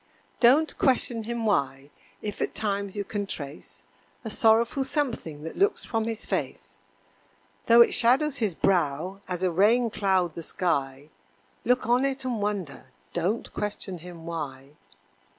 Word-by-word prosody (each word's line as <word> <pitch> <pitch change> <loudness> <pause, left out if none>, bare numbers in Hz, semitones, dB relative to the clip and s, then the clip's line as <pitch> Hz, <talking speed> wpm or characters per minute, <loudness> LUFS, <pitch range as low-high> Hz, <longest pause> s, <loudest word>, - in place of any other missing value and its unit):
Don't 275 +6 +4
question 245 -4 +1
him 235 0 -3
why 140 -7 0 0.3
if 210 -1 -5
at - - -2
times 200 -1 -2
you 205 - -1
can 205 0 -4
trace 145 -4 -7 0.4
A 220 - -4
sorrowful 230 +5 +3
something 255 - -3
that 160 - -6
looks 405 +2 +1
from 225 -1 -1
his 225 -1 -3
face; - - -4 0.9
Though 235 0 +8
it - - +5
shadows 265 +5 +4
his 210 - -1
brow 180 +2 0
as 180 0 -4
a 185 - +2
raincloud 195 -3 +2
the 170 - -6
sky, 140 -5 -2 0.5
Look 250 +1 +2
on 245 +3 +3
it 270 -1 -1
and 240 -4 -2
wonder 200 -9 -3 0.3
don't 185 +7 -2
question 200 -3 -4
him 170 -1 -11
why. 140 -5 -6
205 Hz, 145 wpm, -26 LUFS, 170-235 Hz, 0.9 s, Though